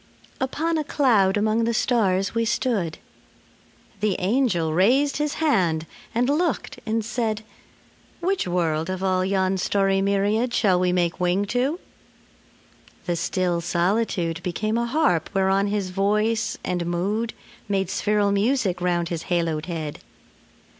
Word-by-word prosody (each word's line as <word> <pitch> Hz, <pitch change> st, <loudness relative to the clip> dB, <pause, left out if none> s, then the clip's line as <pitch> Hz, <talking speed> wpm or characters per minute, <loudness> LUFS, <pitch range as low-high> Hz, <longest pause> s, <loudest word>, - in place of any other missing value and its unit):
Upon 315 Hz, +5 st, -1 dB
a -, -, -1 dB
cloud 220 Hz, -10 st, +3 dB
among 215 Hz, +2 st, +1 dB
the 230 Hz, 0 st, 0 dB
stars 195 Hz, -6 st, +1 dB
we 230 Hz, 0 st, +1 dB
stood. 220 Hz, -7 st, -1 dB, 1.0 s
The 205 Hz, -2 st, +1 dB
angel 185 Hz, -6 st, +1 dB
raised 255 Hz, -, +3 dB
his 295 Hz, 0 st, -1 dB
hand 180 Hz, -, +1 dB, 0.3 s
and 245 Hz, +2 st, +2 dB
looked 295 Hz, -2 st, -1 dB
and 220 Hz, 0 st, 0 dB
said, 225 Hz, -2 st, -2 dB, 0.8 s
"Which 370 Hz, -, 0 dB
world, 165 Hz, -2 st, 0 dB
of 185 Hz, 0 st, -3 dB
all 185 Hz, -1 st, +2 dB
yon 190 Hz, 0 st, +1 dB
starry 195 Hz, +1 st, +1 dB
myriad 205 Hz, +5 st, +1 dB
Shall 190 Hz, -5 st, +3 dB
we 180 Hz, 0 st, +2 dB
make 175 Hz, 0 st, 0 dB
wing 180 Hz, +3 st, +1 dB
to?" 270 Hz, +8 st, 0 dB, 1.3 s
The 175 Hz, -, 0 dB
still 175 Hz, 0 st, 0 dB
solitude 175 Hz, -1 st, 0 dB
Became 215 Hz, +5 st, -2 dB
a 235 Hz, 0 st, 0 dB
harp 255 Hz, -, +1 dB
whereon 195 Hz, +1 st, +2 dB
his 200 Hz, -2 st, -2 dB
voice 210 Hz, +4 st, 0 dB
and 175 Hz, -2 st, -2 dB
mood 205 Hz, +7 st, -1 dB, 0.3 s
Made 195 Hz, -2 st, 0 dB
spheral 205 Hz, -1 st, +1 dB
music 200 Hz, -3 st, +1 dB
round 175 Hz, -1 st, 0 dB
his 170 Hz, -2 st, -4 dB
haloed 165 Hz, -3 st, -1 dB
head. 160 Hz, -4 st, -4 dB
200 Hz, 135 wpm, -24 LUFS, 180-230 Hz, 1.3 s, cloud